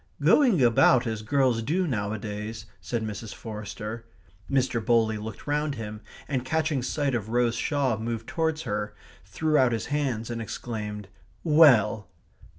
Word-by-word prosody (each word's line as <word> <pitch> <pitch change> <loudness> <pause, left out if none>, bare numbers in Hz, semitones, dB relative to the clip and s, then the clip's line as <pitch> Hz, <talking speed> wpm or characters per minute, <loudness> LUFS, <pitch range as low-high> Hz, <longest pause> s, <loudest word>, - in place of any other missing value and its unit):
"Going 235 - +4
about 120 +1 +5
as 110 -2 -3
girls 130 -1 +2
do 170 +10 0
nowadays 110 -2 -4
" - - -34
said 120 -2 -3
Mrs. 110 0 -6
Forster. 110 +1 -7 0.4
Mr. 130 -4 +1
Bowley 110 -2 +2
looked 110 0 -8
round 150 0 -1
him, 105 -2 -7 0.3
and 130 -4 -1
catching 155 0 0
sight 140 +2 -1
of 110 -3 -2
Rose 120 0 +2
Shaw 135 0 0
moved 115 0 -4
towards 160 -1 -1
her, 105 -3 -3 0.3
threw 155 -1 +1
out 130 -2 +4
his 115 - -2
hands, 125 -6 -1
and 115 -1 -4
exclaimed: 105 -2 -5 0.4
"Well!" 125 - +5
115 Hz, 150 wpm, -26 LUFS, 110-140 Hz, 0.4 s, about